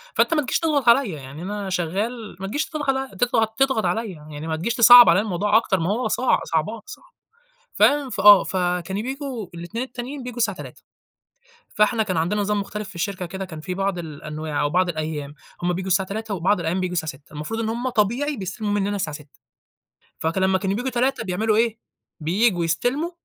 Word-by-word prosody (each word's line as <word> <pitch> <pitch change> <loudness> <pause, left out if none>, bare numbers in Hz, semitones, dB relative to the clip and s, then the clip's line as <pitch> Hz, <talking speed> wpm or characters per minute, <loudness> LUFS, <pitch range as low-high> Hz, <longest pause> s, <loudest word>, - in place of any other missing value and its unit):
فأنت - - +3
ما 300 - +2
تجيش 260 - -1
تضغط 295 -7 +2
عليَّ، 245 -2 +5
يعني 140 +1 -9
أنا 200 +1 -4
شغال 205 +6 -3
ما 195 - -4
تجيش 290 +9 -1
تضغ 270 -4 -1
تضغط 225 -1 +1
تضغط 265 -7 +2
عليَّ، 215 +4 -1
يعني 150 -1 -9
ما 160 - -1
تجيش 195 +9 -2
تصعَّب 240 +1 +9
عليَّ - - +5
الموضوع 210 +1 +2
أكتر 195 -5 +1
ما 165 +3 -1
هو 245 +4 0
صع 255 - +2
صعبان 165 +8 -1
صعب، - - -12 0.6
فاهم 285 -2 +3
فآه، 205 -1 +7
فكانوا 180 +2 -2
بييجوا 265 -4 -5
الاتنين 175 +9 -5
التانيين، 255 +2 -7
بييجوا 245 -1 -7
الساعة 200 -5 +1
15:00، - - -10 0.9
فإحنا 220 +1 +2
كان 185 -5 -2
عندنا 180 +6 0
نظام 205 0 0
مختلف 210 0 -6
في 205 - -12
الشركة 185 +1 -3
كده 190 +2 -6
كان 160 -4 -9
فيه 180 +3 -5
بعض 195 -1 -1
الأنواع 155 -1 -5
أو 145 - +1
بعض 180 +1 +2
الأيام 155 -3 -4 0.3
هُم 180 0 +1
بييجوا 185 +2 -4
الساعة 190 0 +2
15:00 215 0 -4
وبعض 185 +2 +1
الأيام 170 +3 -1
بييجوا 185 -1 -2
الساعة 160 -3 -2
18:00، 140 +3 -20
المفروض 155 +10 -4
إن 220 - -1
هُم 240 +3 -2
طبيعي 245 +6 0
بيستلموا 205 +2 -4
مننا 205 0 0
الساعة 155 -6 -3
18:00، 150 -2 -18 0.8
فك 160 +3 -2
لمّا 190 0 +3
كانوا 195 +1 -1
بييجوا 250 +3 -2
15:00 255 0 0
بيعملوا 210 +3 0
إيه، 230 -1 +1 0.4
بييجوا 180 +3 +1
يستلموا 265 - -1
200 Hz, 195 wpm, -23 LUFS, 175-235 Hz, 0.9 s, تصعَّب